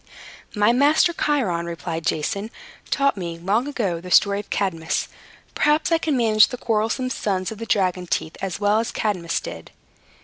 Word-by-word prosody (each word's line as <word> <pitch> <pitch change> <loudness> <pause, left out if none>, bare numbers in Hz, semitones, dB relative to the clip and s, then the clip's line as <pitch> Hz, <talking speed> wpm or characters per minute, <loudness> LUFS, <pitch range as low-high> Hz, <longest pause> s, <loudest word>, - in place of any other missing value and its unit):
"My 210 +3 +4
master 295 +6 +4
Chiron," 210 - 0
replied 165 -1 -4
Jason, 200 +7 -1 0.4
"taught 275 -5 +1
me, 170 -3 -5
long 205 +9 0
ago, 200 -12 -2
the 180 - -9
story 200 +2 +4
of 205 - -9
Cadmus. 165 -5 -1 0.5
Perhaps 300 +2 +2
I 330 - +4
can 310 -4 0
manage 220 -3 +5
the 250 - -6
quarrelsome 225 +3 -1
sons 190 -5 -2
of 220 - -8
the 230 - -6
dragon's 185 -3 0
teeth 160 - -2
as 190 -1 -3
well 205 +1 +3
as 230 - -2
Cadmus 180 -6 -1
did." - - -9
205 Hz, 170 wpm, -22 LUFS, 180-245 Hz, 0.5 s, manage